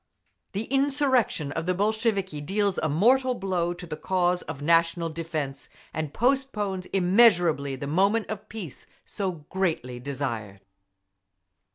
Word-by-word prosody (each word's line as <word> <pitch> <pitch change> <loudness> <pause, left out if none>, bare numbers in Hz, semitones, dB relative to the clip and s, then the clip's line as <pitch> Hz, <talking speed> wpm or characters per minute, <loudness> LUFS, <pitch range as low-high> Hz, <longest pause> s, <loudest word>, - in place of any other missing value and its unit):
The 205 - -2
insurrection 270 - +1
of 165 +3 -3
the 185 - +1
Bolsheviki 200 -5 0
deals 200 +4 0
a 155 - 0
mortal 250 - +3
blow 185 -4 -1
to 175 - -9
the 160 -3 -5
cause 180 +2 +1
of 150 -2 -7
national 165 +2 +2
defence, 155 -4 -4 0.2
and 155 -2 -3
postpones 220 - 0
immeasurably 175 - +4
the 130 - -6
moment 195 +9 +2
of 215 0 -6
peace 200 - -8 0.2
so 185 -7 -4
greatly 160 -10 -1
desired. 120 -7 -4
180 Hz, 130 wpm, -26 LUFS, 155-210 Hz, 0.2 s, immeasurably